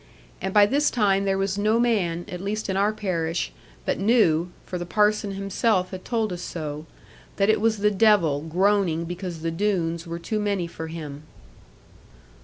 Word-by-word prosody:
And 190 Hz, -, -2 dB
by 205 Hz, +1 st, +6 dB
this 285 Hz, +7 st, +2 dB
time 200 Hz, -4 st, +2 dB
there 195 Hz, -1 st, +1 dB
was 195 Hz, +1 st, -1 dB
no 215 Hz, +3 st, +2 dB
man, 185 Hz, -8 st, +1 dB
at 180 Hz, 0 st, -6 dB
least 210 Hz, +2 st, -3 dB
in -, -, -2 dB
our 200 Hz, +2 st, +2 dB
parish, 170 Hz, -6 st, -2 dB, 0.3 s
but -, -, -1 dB
knew 190 Hz, -6 st, +3 dB, 0.2 s
for 180 Hz, -, -5 dB
the 175 Hz, -, -4 dB
Parson 210 Hz, +1 st, +2 dB
himself 195 Hz, -1 st, 0 dB
had 185 Hz, -1 st, -7 dB
told 225 Hz, -5 st, -1 dB
us 175 Hz, -, -6 dB
so 155 Hz, -3 st, -5 dB, 0.5 s
that 200 Hz, +1 st, +3 dB
it 215 Hz, -, 0 dB
was 225 Hz, -1 st, +2 dB
the 210 Hz, +1 st, +2 dB
devil 195 Hz, -9 st, +3 dB
groaning 175 Hz, 0 st, +1 dB
because 175 Hz, -1 st, -6 dB
the 165 Hz, -, -1 dB
Doones 170 Hz, -2 st, -1 dB
were 170 Hz, 0 st, -4 dB
too 215 Hz, +6 st, -3 dB
many 200 Hz, -4 st, 0 dB
for 160 Hz, -1 st, -7 dB
him. 150 Hz, -3 st, -7 dB
195 Hz, 180 wpm, -24 LUFS, 170-210 Hz, 0.5 s, by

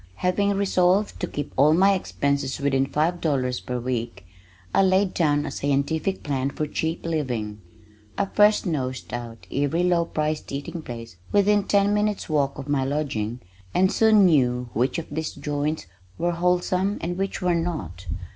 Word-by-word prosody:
Having 200 Hz, -, +1 dB
resolved 195 Hz, +1 st, +2 dB
to 180 Hz, -, -2 dB
keep 145 Hz, -3 st, -5 dB
all 150 Hz, +4 st, +5 dB
my 195 Hz, +3 st, +5 dB
expenses 140 Hz, -7 st, -1 dB
within 135 Hz, -1 st, +1 dB
five 165 Hz, +5 st, 0 dB
dollars 130 Hz, -5 st, 0 dB
per 125 Hz, 0 st, -4 dB
week, 115 Hz, -6 st, -4 dB, 0.5 s
I -, -, +5 dB
laid 190 Hz, 0 st, +3 dB
down 145 Hz, -3 st, +2 dB
a -, -, -4 dB
scientific 145 Hz, +6 st, -1 dB
plan 135 Hz, -2 st, -1 dB
for 150 Hz, -, -3 dB
cheap 160 Hz, +3 st, -3 dB
living. 120 Hz, -10 st, -2 dB, 0.6 s
I 200 Hz, -, +2 dB
first 210 Hz, +2 st, +4 dB
nosed 130 Hz, -9 st, -3 dB
out 115 Hz, -5 st, -6 dB
every 145 Hz, +5 st, +1 dB
low 175 Hz, -1 st, +2 dB
priced 155 Hz, -1 st, -2 dB
eating 140 Hz, +4 st, -5 dB
place 115 Hz, -, -8 dB
within 205 Hz, 0 st, +3 dB
ten 200 Hz, 0 st, +3 dB
minutes 210 Hz, 0 st, 0 dB
walk 140 Hz, -3 st, 0 dB
of 140 Hz, 0 st, -7 dB
my 145 Hz, -2 st, +1 dB
lodging 130 Hz, -5 st, -2 dB, 0.3 s
and 190 Hz, +1 st, +4 dB
soon 220 Hz, -3 st, +5 dB
knew 125 Hz, -7 st, +2 dB
which 125 Hz, +8 st, +1 dB
of 165 Hz, -, -3 dB
these 160 Hz, +1 st, -3 dB
"joints" 145 Hz, +2 st, -2 dB, 0.3 s
were 175 Hz, +1 st, 0 dB
wholesome, 180 Hz, +3 st, +1 dB
and 175 Hz, +2 st, -3 dB
which 195 Hz, +1 st, -2 dB
were 180 Hz, -2 st, +1 dB
not. 150 Hz, -, -3 dB
155 Hz, 165 wpm, -24 LUFS, 135-180 Hz, 0.6 s, all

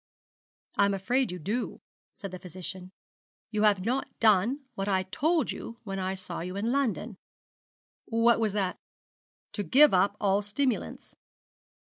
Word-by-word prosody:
'I'm 200 Hz, 0 st, +3 dB
afraid 245 Hz, +5 st, 0 dB
you 180 Hz, -, -5 dB
do,' 210 Hz, +9 st, -3 dB, 0.3 s
said 195 Hz, -3 st, -8 dB
the 185 Hz, -, -7 dB
physician. 185 Hz, +1 st, -7 dB, 0.6 s
'You 215 Hz, -1 st, 0 dB
have 205 Hz, -3 st, +3 dB
not 255 Hz, +4 st, 0 dB
done 220 Hz, +6 st, +3 dB
what 195 Hz, -3 st, -3 dB
I 190 Hz, -1 st, +2 dB
told 305 Hz, -, 0 dB
you 230 Hz, -, -8 dB
when 195 Hz, -3 st, -4 dB
I 190 Hz, 0 st, -2 dB
saw 185 Hz, -2 st, -6 dB
you 180 Hz, +2 st, -5 dB
in 215 Hz, +4 st, -1 dB
London.' 235 Hz, -6 st, -1 dB, 0.9 s
'What 230 Hz, +1 st, +3 dB
was 215 Hz, -3 st, +1 dB
that?' 195 Hz, -3 st, -1 dB, 0.7 s
'To 210 Hz, -, -2 dB
give 270 Hz, -, +6 dB
up 195 Hz, +3 st, +3 dB
all 200 Hz, 0 st, +2 dB
stimulants.' 225 Hz, +4 st, -2 dB
205 Hz, 145 wpm, -28 LUFS, 190-235 Hz, 0.9 s, give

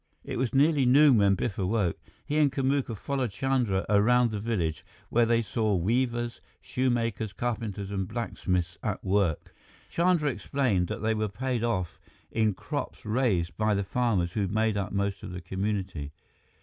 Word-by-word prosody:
It -, -, -4 dB
was 125 Hz, -3 st, 0 dB
nearly 140 Hz, 0 st, +4 dB
noon 135 Hz, -2 st, +6 dB
when 100 Hz, -1 st, +4 dB
Biff 105 Hz, +2 st, -3 dB
awoke. 95 Hz, -2 st, 0 dB, 0.3 s
He 150 Hz, +1 st, 0 dB
and 145 Hz, -2 st, +4 dB
Kamuka 135 Hz, -4 st, 0 dB
followed 135 Hz, +2 st, -2 dB
Chandra 115 Hz, -3 st, 0 dB
around 115 Hz, +4 st, +4 dB
the 105 Hz, -, -3 dB
village, 95 Hz, -8 st, -2 dB, 0.3 s
where 120 Hz, 0 st, +3 dB
they 115 Hz, 0 st, +3 dB
saw 110 Hz, 0 st, 0 dB
weavers, 120 Hz, +5 st, 0 dB, 0.2 s
shoemakers, 115 Hz, -5 st, -1 dB
carpenters, 105 Hz, -4 st, -3 dB
and 95 Hz, -2 st, -2 dB
blacksmiths 90 Hz, -6 st, -2 dB
at 105 Hz, -3 st, -3 dB
work. 95 Hz, -5 st, 0 dB, 0.4 s
Chandra 170 Hz, -4 st, +2 dB
explained 120 Hz, -10 st, 0 dB
that -, -, -5 dB
they 110 Hz, 0 st, +2 dB
were 110 Hz, -1 st, -1 dB
paid 125 Hz, +2 st, -2 dB
off 95 Hz, -8 st, -1 dB, 0.3 s
in 110 Hz, -3 st, +1 dB
crops -, -, -5 dB
raised 105 Hz, -7 st, +1 dB
by 110 Hz, -1 st, +2 dB
the 100 Hz, -, 0 dB
farmers 100 Hz, -5 st, 0 dB
who 100 Hz, 0 st, -1 dB
made 110 Hz, +2 st, +1 dB
up 100 Hz, 0 st, -2 dB
most 100 Hz, 0 st, -1 dB
of -, -, -7 dB
the 90 Hz, -, -5 dB
community. 95 Hz, -4 st, -3 dB
110 Hz, 160 wpm, -28 LUFS, 95-125 Hz, 0.4 s, noon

